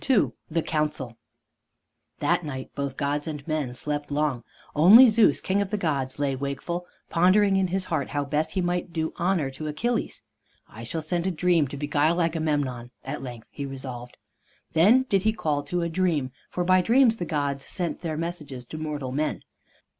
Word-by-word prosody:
II 245 Hz, -7 st, +4 dB, 0.2 s
THE 165 Hz, 0 st, 0 dB
COUNCIL 150 Hz, -6 st, -1 dB, 1.0 s
That -, -, +1 dB
night 130 Hz, -4 st, -6 dB
both 140 Hz, -2 st, -4 dB
gods 145 Hz, +1 st, -1 dB
and 150 Hz, -2 st, -6 dB
men 150 Hz, -6 st, -2 dB
slept 145 Hz, +2 st, -3 dB
long; 145 Hz, -5 st, 0 dB, 0.3 s
only 210 Hz, -, +9 dB
Zeus, 220 Hz, 0 st, +4 dB
king 195 Hz, +2 st, 0 dB
of 200 Hz, -, -2 dB
the 210 Hz, -, -1 dB
gods, 140 Hz, -8 st, -1 dB
lay 140 Hz, -2 st, 0 dB
wakeful, 140 Hz, +6 st, -4 dB, 0.2 s
pondering 195 Hz, +4 st, +4 dB
in 190 Hz, -1 st, +2 dB
his 185 Hz, +1 st, -1 dB
heart 155 Hz, -6 st, -2 dB
how 145 Hz, -1 st, -1 dB
best 150 Hz, +2 st, -1 dB
he 190 Hz, -, 0 dB
might 175 Hz, 0 st, -1 dB
do 160 Hz, -1 st, -2 dB
honor 175 Hz, -6 st, 0 dB
to 155 Hz, +4 st, -6 dB
Achilles. 225 Hz, -, -2 dB, 0.4 s
"I 115 Hz, -, -11 dB
shall 155 Hz, +7 st, -4 dB
send 175 Hz, +3 st, -1 dB
a -, -, +2 dB
Dream 175 Hz, -3 st, +2 dB
to 140 Hz, -, -7 dB
beguile 150 Hz, +4 st, +1 dB
Agamemnon," 150 Hz, -7 st, -1 dB, 0.2 s
at -, -, -4 dB
length 120 Hz, -3 st, -8 dB
he 145 Hz, -, -6 dB
resolved. 130 Hz, -3 st, -7 dB, 0.6 s
Then 210 Hz, +11 st, +5 dB
did 200 Hz, -7 st, +1 dB
he 220 Hz, +2 st, +2 dB
call 150 Hz, -9 st, -1 dB
to 175 Hz, -1 st, -1 dB
a -, -, 0 dB
Dream, 165 Hz, -6 st, 0 dB, 0.2 s
for 180 Hz, -, -2 dB
by 185 Hz, +1 st, +4 dB
Dreams 230 Hz, +3 st, +4 dB
the 175 Hz, -, -3 dB
gods 145 Hz, -4 st, -2 dB
sent 175 Hz, -3 st, -3 dB
their 160 Hz, -3 st, -3 dB
messages 150 Hz, -7 st, -5 dB
to 155 Hz, +6 st, -8 dB
mortal 150 Hz, -4 st, -4 dB
men. 150 Hz, +3 st, -2 dB
155 Hz, 185 wpm, -26 LUFS, 140-180 Hz, 1.0 s, only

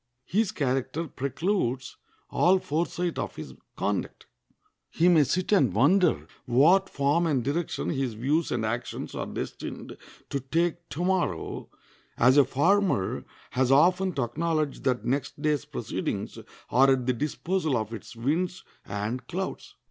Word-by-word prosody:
His 210 Hz, 0 st, +1 dB
character 135 Hz, +4 st, -1 dB
precludes 135 Hz, -, -2 dB, 0.4 s
all 185 Hz, +2 st, +4 dB
foresight 170 Hz, +1 st, -2 dB
of -, -, -4 dB
his -, -, -8 dB, 0.2 s
conduct. -, -, -2 dB, 0.6 s
He 170 Hz, -, +2 dB
may 165 Hz, -4 st, +6 dB
sit 180 Hz, +9 st, -1 dB
and 160 Hz, -, +4 dB
wonder 170 Hz, -, +3 dB, 0.2 s
what 170 Hz, +10 st, +5 dB
form 145 Hz, +5 st, +1 dB
and 135 Hz, -6 st, +1 dB
direction 155 Hz, +5 st, -2 dB
his 135 Hz, -6 st, -2 dB
views 145 Hz, +8 st, 0 dB
and 115 Hz, -2 st, 0 dB
actions 120 Hz, +3 st, -4 dB
are -, -, -4 dB
destined -, -, -6 dB, 0.4 s
to 140 Hz, -, 0 dB
take 170 Hz, +5 st, -1 dB
to 175 Hz, +4 st, -3 dB
morrow, 180 Hz, -, -1 dB, 0.5 s
as 125 Hz, +3 st, +5 dB
a 145 Hz, -, +8 dB
farmer 170 Hz, -, +1 dB, 0.3 s
has 130 Hz, 0 st, +1 dB
often 180 Hz, +6 st, +4 dB
to 135 Hz, -, 0 dB
acknowledge 155 Hz, +4 st, -1 dB
that 125 Hz, -4 st, 0 dB
next 135 Hz, +3 st, -2 dB
day's 150 Hz, -2 st, 0 dB
proceedings -, -, -4 dB, 0.3 s
are 135 Hz, +2 st, +5 dB
at 130 Hz, -2 st, +2 dB
the 125 Hz, -, +2 dB
disposal 155 Hz, +2 st, -1 dB
of 110 Hz, 0 st, -3 dB
its 115 Hz, +1 st, -9 dB
winds 165 Hz, +10 st, -1 dB, 0.2 s
and 110 Hz, +5 st, -4 dB
clouds. 190 Hz, +2 st, -5 dB
145 Hz, 140 wpm, -27 LUFS, 125-175 Hz, 0.6 s, a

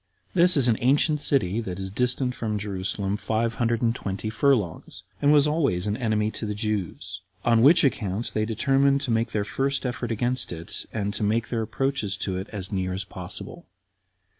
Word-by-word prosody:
This 175 Hz, -2 st, +5 dB
is 130 Hz, -3 st, +5 dB
an 115 Hz, -2 st, +2 dB
ancient 145 Hz, +4 st, +3 dB
city 115 Hz, -7 st, +1 dB
that 90 Hz, -5 st, -5 dB
is 95 Hz, 0 st, -4 dB
distant 125 Hz, +3 st, 0 dB
from 110 Hz, -3 st, -2 dB
Jerusalem 100 Hz, 0 st, -2 dB
five 115 Hz, +1 st, -1 dB
hundred 115 Hz, 0 st, +1 dB
and 115 Hz, -1 st, +3 dB
twenty 100 Hz, +1 st, -4 dB
furlongs, 105 Hz, -, 0 dB, 0.2 s
and 145 Hz, -, +4 dB
was 150 Hz, -1 st, +5 dB
always 140 Hz, -, +1 dB
an 105 Hz, 0 st, 0 dB
enemy 110 Hz, -2 st, 0 dB
to 110 Hz, -, -5 dB
the 105 Hz, -, -3 dB
Jews; 100 Hz, -3 st, -3 dB, 0.2 s
on 115 Hz, -1 st, +4 dB
which 150 Hz, +8 st, +6 dB
account 110 Hz, -5 st, 0 dB
they 110 Hz, -, +1 dB
determined 135 Hz, +5 st, +2 dB
to 135 Hz, -4 st, -2 dB
make 115 Hz, +1 st, +1 dB
their 105 Hz, -2 st, -1 dB
first 135 Hz, +8 st, -1 dB
effort 125 Hz, -1 st, -3 dB
against 120 Hz, +3 st, -1 dB
it, 85 Hz, 0 st, -6 dB
and 105 Hz, -2 st, -2 dB
to -, -, -3 dB
make 110 Hz, +2 st, 0 dB
their 115 Hz, -2 st, -1 dB
approaches 115 Hz, -3 st, -1 dB
to 95 Hz, -2 st, -2 dB
it 95 Hz, +2 st, -5 dB
as 95 Hz, -4 st, -4 dB
near 95 Hz, -2 st, -1 dB
as 95 Hz, +1 st, -3 dB
possible. -, -, -8 dB
110 Hz, 190 wpm, -25 LUFS, 100-130 Hz, 0.2 s, which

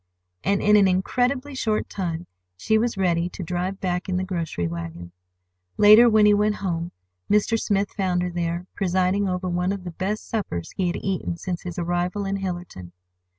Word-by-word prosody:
And 200 Hz, +1 st, +1 dB
in 210 Hz, 0 st, +6 dB
an 200 Hz, -2 st, +5 dB
incredibly 250 Hz, +9 st, 0 dB
short 220 Hz, -5 st, -1 dB
time 175 Hz, -3 st, -4 dB, 0.3 s
she 220 Hz, -, +1 dB
was 230 Hz, -2 st, -1 dB
ready 175 Hz, -2 st, +1 dB
to 180 Hz, -, -7 dB
drive 180 Hz, +3 st, -3 dB
back 180 Hz, 0 st, -2 dB
in 180 Hz, -, 0 dB
the 185 Hz, -, -1 dB
grocery 170 Hz, -, -2 dB
wagon. 85 Hz, +1 st, -6 dB, 0.7 s
Later, 215 Hz, +3 st, +8 dB
when 215 Hz, -1 st, +5 dB
he 210 Hz, -, +6 dB
went 210 Hz, +1 st, +2 dB
home, 175 Hz, -4 st, -3 dB, 0.4 s
Mr. 210 Hz, +2 st, +3 dB
Smith 200 Hz, -1 st, 0 dB
found 180 Hz, -3 st, 0 dB
her 180 Hz, -, -2 dB
there, 170 Hz, 0 st, -2 dB
presiding 190 Hz, +1 st, +1 dB
over 180 Hz, 0 st, -2 dB
one 180 Hz, +1 st, 0 dB
of 200 Hz, -2 st, -4 dB
the 175 Hz, -, -6 dB
best 195 Hz, +5 st, -3 dB
suppers 140 Hz, -, -3 dB
he 185 Hz, -, 0 dB
had 175 Hz, -, -1 dB
eaten 185 Hz, -3 st, -2 dB
since 175 Hz, -1 st, -4 dB
his 175 Hz, -2 st, -7 dB
arrival 175 Hz, +3 st, -1 dB
in 195 Hz, 0 st, -1 dB
Hillerton. 175 Hz, -, -6 dB
185 Hz, 185 wpm, -24 LUFS, 175-205 Hz, 0.7 s, Later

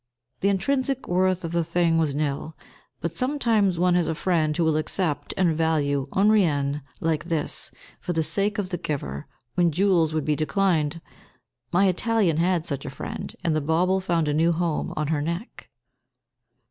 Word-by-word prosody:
The 200 Hz, -, +2 dB
intrinsic 265 Hz, +6 st, 0 dB
worth 185 Hz, 0 st, +1 dB
of 165 Hz, -, -4 dB
the 170 Hz, 0 st, +1 dB
thing 165 Hz, 0 st, +1 dB
was 150 Hz, -4 st, 0 dB
nil, 150 Hz, +1 st, -3 dB, 0.4 s
but 170 Hz, 0 st, -3 dB
sometimes 230 Hz, -, +1 dB
one 180 Hz, +1 st, +3 dB
has 175 Hz, -1 st, +2 dB
a 160 Hz, -, -1 dB
friend 155 Hz, -3 st, 0 dB
who 170 Hz, -, +2 dB
will 160 Hz, -1 st, +2 dB
accept 155 Hz, -2 st, -1 dB
and 175 Hz, -4 st, +2 dB
value 145 Hz, -4 st, 0 dB
un 205 Hz, +3 st, +4 dB
rien 145 Hz, -8 st, +1 dB, 0.2 s
like 160 Hz, -1 st, -1 dB
this, 165 Hz, -4 st, +1 dB, 0.3 s
for -, -, -4 dB
the 160 Hz, -2 st, +1 dB
sake 205 Hz, +6 st, +1 dB
of 195 Hz, -3 st, -2 dB
the 175 Hz, -, -2 dB
giver, 75 Hz, -, -4 dB, 0.3 s
when 175 Hz, +1 st, +2 dB
jewels 175 Hz, -2 st, +2 dB
would 155 Hz, -, -1 dB
be 150 Hz, -1 st, +1 dB
declined. 160 Hz, 0 st, 0 dB, 0.7 s
My 190 Hz, +3 st, +4 dB
Italian 195 Hz, -2 st, +1 dB
had 170 Hz, -1 st, +1 dB
such 140 Hz, -4 st, -2 dB
a -, -, -5 dB
friend, 130 Hz, -, -7 dB
and 165 Hz, -3 st, +1 dB
the 155 Hz, -, +1 dB
bauble 175 Hz, +6 st, +2 dB
found 170 Hz, -4 st, 0 dB
a 145 Hz, -, +1 dB
new 165 Hz, +3 st, +3 dB
home 165 Hz, -2 st, -1 dB
on 150 Hz, -1 st, -1 dB
her 155 Hz, -2 st, 0 dB
neck. 170 Hz, -, -5 dB
165 Hz, 180 wpm, -25 LUFS, 155-185 Hz, 0.7 s, un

